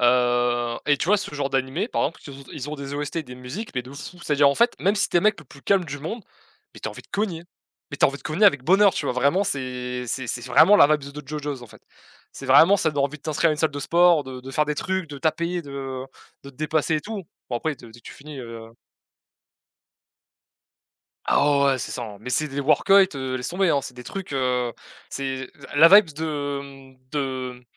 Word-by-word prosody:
Heu 120 -1 +2
et 145 -1 +4
tu 165 - -3
vois 210 +2 +5
ce 185 -5 -6
genre 140 -1 -2
d'animé, 135 - -1
par - - -1
exemple, 160 - -2
qu 145 - -10
ils 135 0 -11
ont - - -13
ils 145 0 -6
ont - - -3
des 140 -1 -7
OST, 145 +3 -3
des 125 -5 -7
musiques 130 - -7
mais 125 - -1
de 130 +2 -12
fou. 155 +5 -9
C'est-à-dire, 145 -1 +4
en 140 - +1
fait, 235 +1 +3
même 200 +3 +2
si 200 - +1
tu - - 0
es - - +5
le - - -5
mec 215 -2 +3
le 150 - -12
plus 140 +1 -16
calme 195 -3 +2
du 145 -2 -6
monde, 200 - -6 0.5
mais - - -12
tu - - -3
as - - -6
envie - - -11
de - - -24
cogner, 190 -5 -2 0.5
mais 140 - -5
tu - - +5
as - - +6
envie 140 - -5
de - - -19
cogner 165 +7 +3
avec 145 -9 +3
bonheur, 195 +3 +5
tu - - -2
vois? - - 0
Vraiment 140 +10 +2
c'est 125 -4 -3
c'est 130 +1 -3
c'est 120 +1 -3
vraiment 160 +11 +6
la 145 - +8
vibes 140 -1 -10
de 150 -2 -9
JoJo's, 145 -3 -5
en - - -10
fait. - - -17 0.5
C'est 135 - -8
vraiment, 165 +9 +6
ça 160 - +1
donne 140 -2 0
envie 150 +2 -4
de - - -39
t'inscrire 160 +1 +1
à - - +2
une 150 - -4
salle 160 -1 +2
de 145 - -6
sport, 170 0 +4
de 130 -1 -8
de 130 - -9
faire 150 +3 +1
des 150 0 -2
trucs, 185 0 -2
de 140 - -7
taper, 170 +3 -1
de, 140 - -11
heu, 135 -1 -5 0.4
de 140 - -9
te 135 - -26
dépasser 155 0 0
et - - -2
tout. 205 0 -6 0.3
Bon, 120 - 0
après, 155 +4 -2
de 120 -3 -14
dès 120 - -15
que - - -46
tu - - -8
finis, 145 -1 -10
heu 115 -2 -9 2.6
Ah - - +4
ouais, 140 - +3
ouais, 140 - +4
ouais, 130 - 0
c'est - - -4
ça, 120 - -4
hein, 105 -3 -8
mais 125 +4 -7
c'est 155 +4 +1
des 140 0 -5
work-outs, 190 +7 +5
heu, 130 -1 -3
laisse 125 - -4
tomber, 185 0 +1
hein. 140 -2 +2
C'est 130 - -9
des 125 - -10
trucs, 190 +5 -7
heu, 125 -3 0 0.4
c'est, 130 -1 -4
heu, - - -24 0.2
la 160 +3 +8
vibes 190 -5 +7
de, 145 -2 -3
hem, 135 -1 -14
de, 130 -3 -4
140 Hz, 265 wpm, -24 LUFS, 130-165 Hz, 2.6 s, la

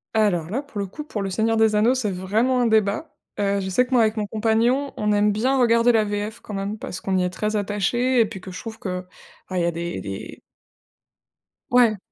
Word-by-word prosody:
Alors 180 -7 +2
là, 255 +6 -1
pour 280 -8 -8
le 200 - -1
coup, 300 +11 -8
pour 210 -9 -4
le 195 - -3
Seigneur 225 +3 +1
des 220 -1 +4
anneaux, 225 +5 +4
c'est 225 -6 -1
vraiment 220 +8 +1
un 240 - +3
débat. 220 +7 +1 0.3
Heu, 200 0 +1
je 190 - -4
sais 190 +7 +3
que 250 - -10
moi 250 -2 +5
avec 215 0 +1
mon 210 -2 -2
compagnon, 230 +6 +1
on 210 0 0
aime 210 0 +3
bien 255 +6 +1
regarder 235 -1 +4
la 225 -2 +3
VF 205 +2 -3
quand 210 - -9
même 200 +2 -3
parce 185 -3 -7
qu'on 190 -1 0
y 185 - +2
est 180 - -1
très 215 +3 -2
attachés 210 +5 +1
et 230 - +5
puis 205 - -8
que 185 0 -9
je 180 - -7
trouve 225 -1 -7
que, 180 -2 -4 0.5
bah, 185 - -3
il 175 - +1
y - - +2
a 170 - +1
des 170 +1 -4
des 95 -1 -7 1.3
Ouais. 240 -3 +4
215 Hz, 245 wpm, -23 LUFS, 195-235 Hz, 1.3 s, moi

